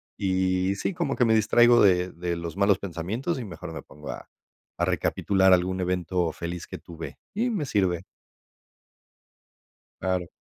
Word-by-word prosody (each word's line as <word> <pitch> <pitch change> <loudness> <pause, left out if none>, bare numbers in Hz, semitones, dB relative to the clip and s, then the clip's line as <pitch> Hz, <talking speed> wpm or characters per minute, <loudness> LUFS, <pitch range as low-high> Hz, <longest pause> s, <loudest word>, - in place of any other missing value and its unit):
y 95 0 +1
sí, 145 - -2
como 165 -5 -1
que 125 - +3
me 110 - +4
distraigo 120 +2 +5
de 90 -2 +4
de 85 0 -3
los 85 -1 -5
malos 100 0 +3
pensamientos, 100 - -3
y 120 - -5
mejor 85 -6 -8
me - - -6
pongo 75 +2 -9
a - - -9 0.5
a - - +1
recapitular 95 -1 +2
algún 95 +1 +1
evento 90 -1 0
feliz 85 0 -5
que - - -7
tuve, 85 -1 -9 0.2
y 230 +5 0
me 205 -10 -1
sirve. 95 -8 0 2.0
Claro. 90 -1 -1
95 Hz, 155 wpm, -26 LUFS, 90-110 Hz, 2.0 s, distraigo